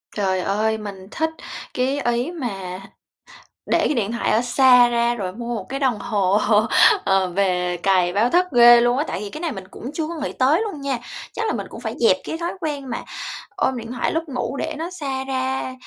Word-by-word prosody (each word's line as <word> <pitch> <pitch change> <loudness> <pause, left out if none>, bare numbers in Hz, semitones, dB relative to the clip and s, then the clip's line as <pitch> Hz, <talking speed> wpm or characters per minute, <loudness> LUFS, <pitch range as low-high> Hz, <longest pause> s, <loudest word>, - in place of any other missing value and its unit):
Trời 190 -3 0
ơi, 215 +4 0
mình 200 -3 -8
thích 320 0 0 0.4
cái 265 +3 0
ý 245 +7 -1
mà 195 - -5 0.8
để - - +2
cái - - +1
điện 225 -4 -1
thoại 235 - -1
ở 220 - +3
xa 250 0 +5
ra 235 0 +1
rồi 190 -5 -4
mua 235 +2 -4
một - - -5
cái 270 +1 -3
đồng 255 -6 +1
hồ, 200 -3 +1 0.7
ờ, 195 -1 +3
về 180 -1 0
cài 185 -2 +3
báo 215 +5 +2
thức 360 +4 +3
ghê 240 0 +8
luôn 240 +2 +2
á. 290 - +1
Tại - - -3
vì 205 0 -5
cái 305 - -8
này 335 -3 -1
mình 195 -6 -7
cũng 255 - -7
chưa 310 0 -2
có 340 - -5
nghĩ 295 -3 -4
tới 290 +9 +3
luôn 400 -10 -4
nha. 275 -3 -1 0.4
Chắc 450 0 -2
là - - 0
mình - - -4
cũng - - -9
phải - - -4
dẹp 465 - +4
cái 320 - -4
thói 340 +1 -3
quen 285 -4 -4
mà 235 - -3 0.5
ôm 260 - 0
điện 230 0 -7
thoại 245 - -1
lúc 325 0 -1
ngủ 260 0 -3
để 315 +2 -3
nó 330 +3 -4
xa 275 -7 -4
ra 260 0 -2
245 Hz, 225 wpm, -22 LUFS, 205-280 Hz, 0.8 s, ghê